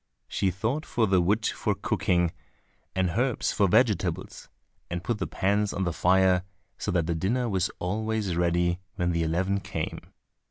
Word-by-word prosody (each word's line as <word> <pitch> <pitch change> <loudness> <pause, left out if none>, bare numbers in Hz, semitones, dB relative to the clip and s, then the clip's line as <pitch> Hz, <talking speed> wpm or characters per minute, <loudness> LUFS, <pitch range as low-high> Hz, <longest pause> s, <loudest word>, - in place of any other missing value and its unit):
She 95 - 0
sought 115 - -1
for 115 -6 +1
the 95 -3 +3
wood 105 +5 +1
for - - 0
cooking 85 -2 +1 0.6
and 95 -2 +1
herbs 125 +5 0
for 100 - +3
vegetables, 90 -4 +1 0.4
and 85 +1 -3
put 115 0 -1
the - - -2
pans 100 +1 +1
on 95 - -1
the 85 -2 -1
fire 95 +1 +4 0.4
so - - -3
that 85 -3 +1
the 85 - 0
dinner 115 +10 0
was 95 -4 +1
always 105 0 -1
ready 85 +1 +1 0.2
when 90 -2 0
the 85 -1 0
eleven 90 +5 0
came. - - -4
95 Hz, 165 wpm, -27 LUFS, 85-105 Hz, 0.6 s, fire